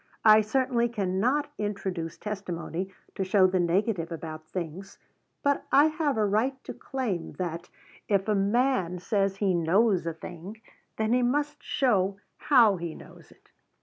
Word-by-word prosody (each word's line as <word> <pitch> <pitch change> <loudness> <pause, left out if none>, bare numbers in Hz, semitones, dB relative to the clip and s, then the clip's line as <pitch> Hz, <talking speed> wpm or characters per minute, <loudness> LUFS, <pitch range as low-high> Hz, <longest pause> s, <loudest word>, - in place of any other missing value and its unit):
I 215 0 +8
certainly 240 +1 +1
cannot 235 +8 0
introduce 195 -6 -3
testimony 190 -3 -5 0.2
to 195 - -2
show 190 0 +4
the 185 0 +2
negative 175 0 0
about 155 -1 -6
things; 180 +2 -6 0.5
but 285 0 +1
I 285 +2 +7
have 305 -5 -1
a 215 - +2
right 220 +7 +1
to - - -7
claim 230 -11 -4
that, 175 -1 -5 0.4
if 200 -1 +1
a 215 - +2
man 200 -2 +1
says 195 +1 0
he 195 -2 +1
knows 180 +2 +2
a 165 - -1
thing, 175 +6 -9 0.4
then 220 +1 +1
he 250 - +3
must 290 +4 0
show 200 -7 +1 0.2
how 230 -8 +5
he 170 -2 -5
knows - - -14
it. - - -24
200 Hz, 150 wpm, -27 LUFS, 180-235 Hz, 0.5 s, I